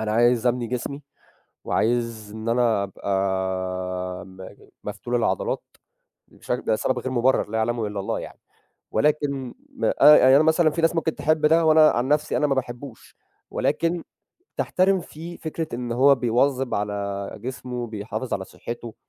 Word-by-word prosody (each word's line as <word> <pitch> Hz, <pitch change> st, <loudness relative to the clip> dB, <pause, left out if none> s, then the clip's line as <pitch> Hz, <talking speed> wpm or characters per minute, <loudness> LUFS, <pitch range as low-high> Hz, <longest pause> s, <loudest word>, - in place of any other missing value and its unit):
أنا 110 Hz, -1 st, -1 dB
عايز 120 Hz, +1 st, +3 dB
أبني 120 Hz, 0 st, +1 dB
جسمي 125 Hz, +4 st, -4 dB, 0.6 s
وعايز 115 Hz, -2 st, -1 dB
إن 110 Hz, +1 st, -4 dB
أنا 115 Hz, -4 st, +2 dB
أبقى 100 Hz, +1 st, -5 dB, 1.1 s
م 95 Hz, 0 st, -11 dB, 0.4 s
مفتول -, -, -4 dB
العضلات -, -, 0 dB, 0.7 s
بش -, -, -7 dB
ده 110 Hz, -, 0 dB
سبب 130 Hz, -, -1 dB
غير 130 Hz, -, -4 dB
مُبرَّر 125 Hz, -3 st, +2 dB
لا 110 Hz, -, -1 dB
يعلمه 115 Hz, 0 st, 0 dB
إلا 105 Hz, -1 st, -4 dB
الله 100 Hz, -, -2 dB
يعني، -, -, -10 dB, 0.5 s
ولكن 140 Hz, 0 st, 0 dB, 0.2 s
م -, -, -1 dB
أ 150 Hz, -, +7 dB
يعني 130 Hz, +1 st, +6 dB
أنا 150 Hz, -, +6 dB
مثلًا 160 Hz, 0 st, +4 dB
في 165 Hz, +2 st, -3 dB
ناس 165 Hz, +1 st, +2 dB
ممكن 160 Hz, -1 st, 0 dB
تحِب 155 Hz, 0 st, +1 dB
ده 165 Hz, +2 st, +4 dB
وأنا 155 Hz, -1 st, +7 dB
عن 120 Hz, +2 st, -1 dB
نفْسي، 150 Hz, +1 st, +1 dB
أنا 150 Hz, -, +2 dB
ما 135 Hz, -, +1 dB
باحبّوش 125 Hz, -1 st, -6 dB, 0.4 s
ولكن 170 Hz, 0 st, 0 dB, 0.5 s
تحترِم 190 Hz, +1 st, +2 dB
فيه 170 Hz, +1 st, -9 dB
فكرة 160 Hz, 0 st, -4 dB
إن 120 Hz, -1 st, -3 dB
هو 135 Hz, +4 st, +5 dB
بيواظب 125 Hz, +1 st, +1 dB
على 100 Hz, -1 st, -3 dB
جسمه، 125 Hz, -1 st, -5 dB
بيحافظ 110 Hz, +3 st, -4 dB
على 95 Hz, -, -4 dB
صحّته، 120 Hz, +1 st, -8 dB
125 Hz, 155 wpm, -24 LUFS, 110-150 Hz, 1.1 s, أ